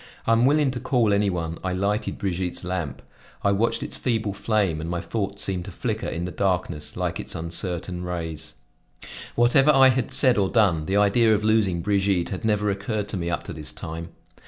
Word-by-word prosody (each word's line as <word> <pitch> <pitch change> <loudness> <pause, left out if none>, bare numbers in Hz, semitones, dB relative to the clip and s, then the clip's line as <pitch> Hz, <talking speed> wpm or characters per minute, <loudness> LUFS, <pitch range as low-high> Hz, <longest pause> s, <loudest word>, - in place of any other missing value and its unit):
Unwilling 130 +5 +3
to 125 - -4
call 115 -4 +2
any 100 0 +2
one, 85 -2 -3
I 95 -1 -1
lighted 100 +4 -1
Brigitte's 90 -2 -2
lamp; 80 -7 -4 0.4
I 100 - +3
watched 105 +4 +1
its - - -6
feeble 110 -5 -1
flame 100 -5 0
and 80 - -5
my 85 0 -2
thoughts 100 0 -3
seemed 90 -2 -1
to - - -7
flicker - - -3
in 85 +2 -3
the 90 - -4
darkness 90 -6 -2
like - - -2
its - - -6
uncertain 90 +1 -3
rays. 80 -7 -4 0.8
Whatever 120 +4 +4
I 135 -3 +7
had 130 -2 0
said 125 -5 +5
or 95 -1 +2
done, 90 -9 +2
the 95 +2 +1
idea 110 +2 +4
of 105 - -2
losing 105 -5 +2
Brigitte 100 -3 +1
had 95 - -5
never 105 -2 +1
occurred 105 +1 -3
to 100 - -3
me 85 -1 -2
up 85 - -2
to - - -7
this 75 -1 -5
time. 80 +1 -6
100 Hz, 195 wpm, -24 LUFS, 85-110 Hz, 0.8 s, I